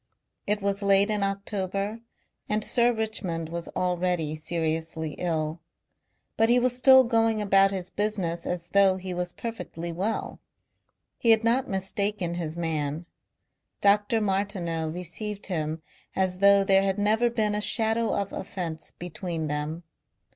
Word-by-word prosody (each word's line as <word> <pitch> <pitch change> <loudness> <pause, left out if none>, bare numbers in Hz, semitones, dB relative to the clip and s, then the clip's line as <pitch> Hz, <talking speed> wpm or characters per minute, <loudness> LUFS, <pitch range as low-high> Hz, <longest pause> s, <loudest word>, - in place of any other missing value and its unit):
It 205 0 0
was 200 0 0
late 200 +1 +4
in 210 -1 0
October 195 +1 -2 0.5
and 210 0 +1
Sir 240 +1 +3
Richmond 205 -8 -3
was 170 0 -5
already 180 -3 0
seriously 160 0 -2
ill. 160 -2 -2 0.8
But 225 +1 +4
he 240 - +5
was 250 0 +1
still 260 +1 +7
going 225 -2 +2
about 195 -1 +4
his 185 -2 -4
business 195 -5 -1
as 175 -1 -3
though 195 -1 +4
he 185 -1 -5
was 180 0 -3
perfectly 175 -8 -6
well. 195 +7 -3 0.8
He 235 - +1
had 225 0 +6
not 245 +3 +2
mistaken 195 -1 -1
his 170 -2 -4
man. 160 -1 -2 0.7
Dr. 205 +2 +3
Martineau 190 -5 -1
received 180 +5 -5
him 160 -3 -3 0.3
as 185 -1 0
though 200 0 +6
there 195 -1 +4
had 195 0 0
never 220 +4 +2
been 220 -3 0
a 210 - -1
shadow 225 +1 +1
of 200 -1 -4
offence 165 -4 -5
between 170 -2 -4
them. 150 +3 -3
195 Hz, 140 wpm, -26 LUFS, 170-210 Hz, 0.8 s, still